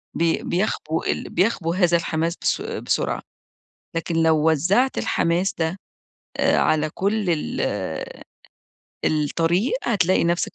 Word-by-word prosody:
بي 165 0 +1
بيخبو 175 -4 -1
ال - - -2
بيخبو 180 -3 +1
هذا 175 -2 +3
الحماس 165 0 -1
بس - - +1
بسرعة، 455 +2 -2 0.7
لكن 165 0 -2
لو 160 -1 +4
وزّعت 190 - +2
الحماس 175 +3 +1
ده 165 +3 -1 0.6
آآ - - +3
على 155 0 +2
كل 205 +2 0
ال 160 -3 -1 1.4
الطريق 165 - +1
هتلاقي 185 -6 +2
نَفسَك 170 +1 0
170 Hz, 115 wpm, -23 LUFS, 160-195 Hz, 1.4 s, لو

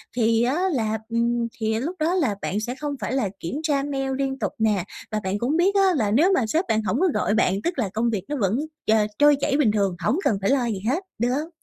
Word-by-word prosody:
thì 230 -1 +2
á 275 +9 +1
là, 220 -3 0
ừm, 235 0 0
thì 220 0 0
lúc 325 +9 -3
đó 320 +3 +1
là 275 - +1
bạn 205 - -2
sẽ 240 +4 -4
không 290 +1 -4
phải - - -2
là 260 -7 0
kiểm 170 - -5
tra 285 -3 +1
mail 270 -2 -2
liên 270 -1 -2
tục - - -1
nè, 210 -5 +2 0.3
và 215 - 0
bạn 190 +2 -2
cũng 265 +8 0
biết 380 +4 +2
á 395 - +5
là 210 -6 +1
nếu 320 - +4
mà 235 -9 +1
sếp 325 - 0
bạn 220 0 +1
hổng - - 0
có 375 - +3
gọi 210 - +1
bạn 200 -4 +3
tức 345 -4 -2
là 215 -6 0
công 230 +2 +1
việc 200 -5 -2
nó 295 - -1
vẫn 205 +6 +1 0.3
tr - - +3 0.3
trôi 295 0 +6
chảy 275 0 +1
bình 255 -8 +3
thường, 200 -4 0
hổng 275 - +2
cần 205 - +2
phải 195 - +1
lo 265 -3 +2
gì 220 -5 -2
hết, 325 +9 0 0.2
được 240 +2 +1
hông? 295 +6 -2
240 Hz, 270 wpm, -24 LUFS, 215-290 Hz, 0.3 s, trôi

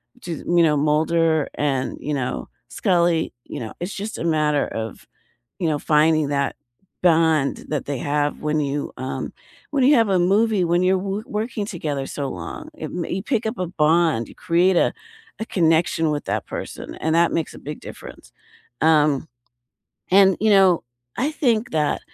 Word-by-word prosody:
which 250 - -14
is, 165 - -4
you 175 -1 +4
know, 150 -2 +3
Mulder 160 +1 +2
and, 135 -3 -1
you 150 - -3
know, 130 -3 -3 0.2
Scully, 170 -3 +1
you - - -7
know? 110 -2 -6
It's 180 +3 -4
just 210 +3 -5
a - - -4
matter 150 -3 +2
of, 110 -1 -6 0.5
you 170 - 0
know, 150 - +1
finding 155 -1 +3
that 140 -1 0 0.5
bond 160 -4 +3
that 150 -3 -2
they 140 -1 -3
have 145 0 -1
when 150 0 0
you 140 0 -2
um, 130 +1 -4 0.4
when 275 -3 +2
you 280 +4 +6
have 225 -3 +3
a 190 - +3
movie, 200 +2 +3
when 175 +1 +2
you're 190 +1 +3
w 195 +3 -3
working 220 -3 -3
together 155 -9 -3
so 140 -2 -4
long. 85 -2 -7
It - - -6
mm, 175 -2 -4
you 190 - -2
pick 230 -3 -1
up 220 +3 -2
a 180 - -1
bond, 160 -6 +2
you - - -12
create 180 +3 +2
a - - +3 0.5
a 220 - -3
connection 165 -3 +2
with 145 -1 -3
that - - -2
person, - - -7
and 160 0 -1
that 170 0 +4
makes 165 - -2
a - - -11
big 150 +1 -7
difference. - - -11 0.5
Um, 150 -2 +3 0.8
and, 195 0 +6
you 220 - +3
know, 190 -4 +5 0.3
I 290 +4 0
think 245 -5 0
that, 150 -2 +1
165 Hz, 180 wpm, -22 LUFS, 150-190 Hz, 0.8 s, you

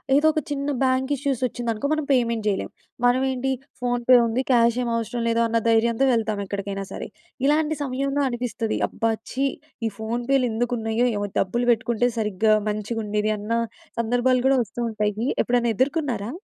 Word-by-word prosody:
ఏదో 300 +2 +4
ఒక 310 - 0
చిన్న 280 0 -2 0.2
బ్యాంక్ 260 +1 +1
ఇష్యూస్ 275 -3 -2
వచ్చిందనుకో 235 +2 -3
మనం 310 -1 -1
పేమెంట్ 235 -4 +2
చేయలేం. 200 -2 -1 0.4
మనం 245 +2 +4
ఏంటి 260 +1 -1 0.3
ఫోన్‌పే 245 0 +4
ఉంది 235 +3 0
క్యాష్ 235 -1 +4
ఏమి 235 -1 -1
అవసరం 230 +1 -3
లేదు 230 0 +2
అన్న 230 0 +1
ధైర్యంతో 230 +3 +3
వెళ్తాం 220 -3 0
ఎక్కడికైనా 195 0 -4
సరే. - - -5 0.4
ఇలాంటి 305 +1 +2
సమయంలో 275 +1 -1
అనిపిస్తుంది 240 -2 -2
"అబ్బా! 225 +1 0 0.2
ఛీ 270 +2 +1 0.4
ఈ - - 0
ఫోన్‌పే‌లు 240 +4 0
ఎందుకు 240 +2 -1
ఉన్నాయో 225 +2 +1
ఏమో 205 - -1
డబ్బులు 240 +6 0
పెట్టుకుంటే 235 +1 +1
సరిగ్గా 215 0 +2 0.2
మంచిగుండేది" 210 0 -1
అన్న 210 +2 -6 0.5
సందర్భాలు 245 +2 +2
కూడా 270 -1 +4
వస్తూ 205 - -10
ఉంటాయి. 210 -1 -1 0.3
ఎప్పుడైనా 240 -1 +1
ఎదుర్కొన్నారా? 260 -6 0
240 Hz, 155 wpm, -24 LUFS, 220-260 Hz, 0.5 s, ఏదో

